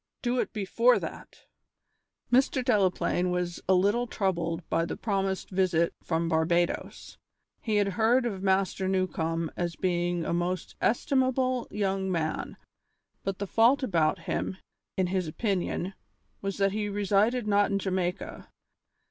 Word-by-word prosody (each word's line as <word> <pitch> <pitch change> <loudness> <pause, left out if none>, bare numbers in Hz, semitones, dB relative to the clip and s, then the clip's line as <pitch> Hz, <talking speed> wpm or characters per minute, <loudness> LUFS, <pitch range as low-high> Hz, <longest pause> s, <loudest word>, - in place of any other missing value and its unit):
"Do 245 0 +1
it - - -1
before 230 +4 +3
that!" - - -8 0.9
Mr. 260 0 +3
Delaplaine 185 -5 +2
was 180 -1 -2
a 190 - +6
little 205 +7 +2
troubled 175 -5 -2
by 165 - +1
the 170 - -4
promised 195 -3 -2
visit 180 -3 +2
from 165 0 0
Barbadoes. 170 +1 -1 0.4
He 220 -2 -1
had 205 -1 +3
heard 230 +5 +2
of 200 -5 -3
Master 190 0 +1
Newcombe 165 -4 -1
as 175 -1 -2
being 175 -2 0
a - - -1
most 175 +1 -2
estimable 255 0 +1
young 195 -2 -1
man, 160 -3 -2 0.7
but 195 -1 -2
the 200 - -3
fault 235 +7 +4
about 170 -7 +2
him, 190 - -2 0.4
in 190 - +2
his 180 -1 -1
opinion, 190 +1 -2 0.5
was 195 0 -3
that 195 -1 +2
he 210 0 -2
resided 205 +4 +1
not 205 0 +3
in 200 - +1
Jamaica. 185 -2 -3
190 Hz, 140 wpm, -28 LUFS, 175-210 Hz, 0.9 s, a